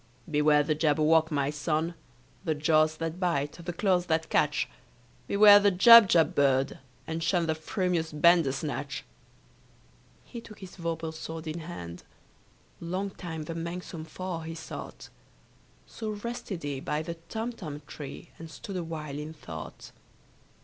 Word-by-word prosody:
"Beware 150 -1 +4
the 155 +1 +1
Jabberwock, 155 +1 +3
my 140 -2 0
son! 155 +3 -1 0.5
The 160 -4 0
jaws 155 +1 +3
that 165 +1 -4
bite, 165 -6 0
the 175 - -3
claws 180 -1 +1
that 160 0 0
catch! 150 0 +2 0.6
Beware 205 0 +8
the 205 0 +4
Jubjub 185 -5 +7
bird, 135 -1 +2 0.3
and 160 +1 -4
shun 170 +1 +1
The 160 - +1
frumious 165 0 -1
Bandersnatch!" 150 -3 +1 1.2
He 235 - -8
took 215 -2 -13
his 190 -2 -11
vorpal 165 -2 -4
sword 160 0 -7
in 160 +2 -4
hand: 90 - -8 0.8
Long 185 +4 -3
time 165 -4 -6
the 165 - -5
manxome 170 0 -6
foe 180 +1 -5
he 165 0 -7
sought. 165 - -8 0.8
So 220 -1 -6
rested 210 -4 -5
he 140 -2 -3
by 150 +3 -2
the 170 +1 -6
Tumtum 215 -11 -5
tree, 150 +3 -9
And 165 0 -9
stood 190 +4 -7
awhile 155 -4 -5
in 155 +1 -6
thought. 80 - -9
160 Hz, 140 wpm, -28 LUFS, 150-180 Hz, 1.2 s, Beware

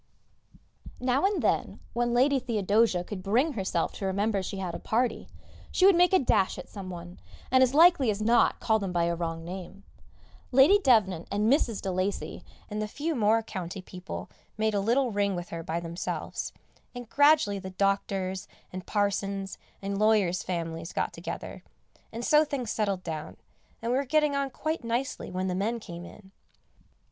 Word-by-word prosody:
Now 255 +6 +1
and 405 -1 -1
then, - - 0
when 240 0 0
Lady 265 +3 +3
Theodosia 215 -5 +1
could 190 +1 -6
bring 245 - +1
herself 190 -6 -1
to 195 - -5
remember 200 +1 0
she 190 +1 -5
had 185 -3 -4
a - - -5
party, 235 +1 -1 0.4
she 370 - +3
would 390 -2 +7
make 355 0 +5
a 380 - +6
dash 205 - +2
at - - -8
some 195 -3 -8
one, 175 0 -9 0.3
and 260 0 +5
as 260 +1 +3
likely 320 -6 +6
as 205 -1 -1
not 230 +3 +3
call 220 -1 +2
them 195 -3 -3
by 175 -1 +1
a 170 0 +1
wrong 165 -1 -4
name. 190 +2 -8 0.7
Lady 275 +11 +6
Devnant 200 - +3
and 210 +5 +2
Mrs. 235 -8 0
de 190 - -1
Lacy 185 +2 -2 0.2
and 210 0 -4
the 215 - -2
few 300 +9 -3
more 225 -3 +2
county 185 -2 -6
people 185 0 -8 0.3
made 220 0 +1
a 200 - +1
little 240 +5 +2
ring 200 -1 0
with 175 0 -5
her 165 - -5
by 165 +1 -3
themselves, 170 +1 -4 0.4
and 245 -1 -7
gradually 285 -8 +4
the 190 -1 -7
doctors', 195 0 -1 0.3
and 185 -1 -7
parsons', 200 -1 -1 0.2
and 200 0 -2
lawyers' 210 -5 +3
families 165 -1 -4
got - - -1
together, - - -7 0.5
and 230 +2 -5
so 300 0 +5
things 270 -7 -3
settled 200 -4 -1
down, 155 -2 -6 0.5
and 230 - 0
we 255 - +2
were - - 0
getting 300 +1 +2
on 280 -1 0
quite 310 +2 -3
nicely 235 +3 -2
when 185 +1 -2
the 185 - -1
men 215 +6 -1
came 175 -4 -9
in. 190 +1 -14
205 Hz, 180 wpm, -28 LUFS, 185-250 Hz, 0.7 s, would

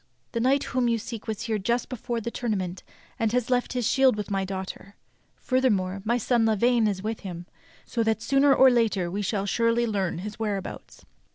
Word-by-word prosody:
The 230 - -2
knight 265 +4 +2
whom 250 -1 0
you 230 -1 +2
seek 225 0 -7
was 220 -1 -3
here 220 -2 -1
just 235 +5 0
before 240 -1 -4
the 235 +1 -4
tournament 190 -7 -3 0.4
and 225 -2 +1 0.2
left 245 0 +1
his 245 -3 0
shield 265 -1 +4
with 210 -1 -5
my 195 -1 0
daughter. 190 +1 -6 0.4
Furthermore, 200 -8 0
my 235 +3 +1
son 235 -1 +2
Lavaine 230 +1 +3
is 195 -2 -2
with 220 +1 -3
him, 175 -3 -7 0.4
so 235 - -2
that 220 -1 0
sooner 275 +2 +4
or 265 -1 +7
later 210 -7 +1
we 200 +3 -2
shall 200 0 -1
surely 230 +3 +2
learn 200 -6 -1
his 210 +5 -7
where 210 -3 0
abouts." 190 - -9
225 Hz, 195 wpm, -26 LUFS, 200-240 Hz, 0.4 s, or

